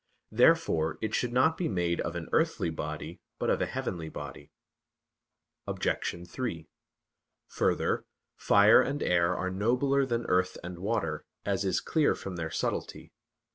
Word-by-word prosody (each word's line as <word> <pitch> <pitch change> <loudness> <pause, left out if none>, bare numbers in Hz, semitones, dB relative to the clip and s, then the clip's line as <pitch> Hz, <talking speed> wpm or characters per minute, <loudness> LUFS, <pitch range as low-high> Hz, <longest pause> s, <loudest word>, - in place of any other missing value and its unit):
Therefore 80 0 +3
it 110 -1 -3
should 125 - 0
not 130 +6 +3
be 175 - -1
made 85 -3 0
of 85 - -4
an 85 -2 -5
earthly 80 - +1
body, 80 - -6 0.2
but - - 0
of - - +1
a - - +1
heavenly 85 -4 -4
body. 75 0 -9 1.2
Obj. 85 0 -2
3: 85 -6 -4 0.8
Further, - - 0 0.3
fire 100 +2 +6
and 145 +1 -2
air 90 0 +2
are 95 - -2
nobler 125 +7 +1
than 120 -1 -1
earth 90 0 +1
and 90 0 -7
water, 95 -5 -1 0.2
as 100 -1 0
is 95 - 0
clear 155 -3 +2
from 95 -2 -7
their 80 -2 -3
subtlety. - - -3
95 Hz, 145 wpm, -29 LUFS, 85-120 Hz, 1.2 s, fire